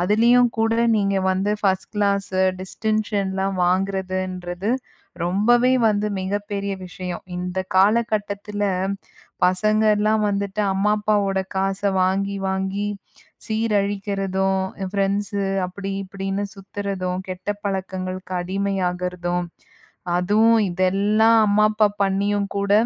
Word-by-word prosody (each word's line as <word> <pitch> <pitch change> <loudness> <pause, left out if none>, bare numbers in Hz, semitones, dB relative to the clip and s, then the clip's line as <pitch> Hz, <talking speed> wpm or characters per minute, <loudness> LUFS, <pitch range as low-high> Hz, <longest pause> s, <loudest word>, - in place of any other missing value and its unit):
அதுலையும், 235 +6 +4
கூட 225 0 +2 0.2
நீங்க 200 -1 +1
வந்து 190 +2 0
1ஸ்ட் 190 -2 0
கிளாஸ் 200 -2 +1 0.3
டிஸ்டன்ஷன்லாம் 195 -1 -1
வாங்குறதுன்றது 185 0 -1 0.5
ரொம்பவே 240 +8 +3 0.2
வந்து 210 0 +1
மிகப்பெரிய 200 +1 -3
விஷயம். 180 0 -6
இந்த 180 +1 -3 0.2
காலகட்டத்துல, 205 0 +1 0.8
பசங்கள்லாம் 215 +2 +2
வந்துட்டு 200 +1 -1
அம்மா, 200 +2 +2
அப்பாவோட 205 -2 +1 0.2
காச 195 +1 -1 0.2
வாங்கி 195 +2 0
வாங்கி 190 +2 -1 0.6
சீரழிக்குறதும், 200 -3 0 0.3
ஃப்ரெண்ட்ஸு 200 +1 0 0.2
அப்படி, 195 +2 -6
இப்படின்னு 195 +1 -3
சுத்துறதும், 195 -2 -4
கெட்ட 185 +2 -7 0.2
பழக்கங்களுக்கு 185 -1 -4
அடிமையாகுறதும் 180 -2 -2 0.7
அதுவும் 215 +6 +4
இதெல்லா 195 +5 +2 0.2
அம்மா, 205 +1 +3
அப்பா 215 0 +3 0.2
பண்ணியும் 200 +1 +1
கூட 200 0 0
195 Hz, 90 wpm, -22 LUFS, 190-205 Hz, 0.8 s, அதுலையும்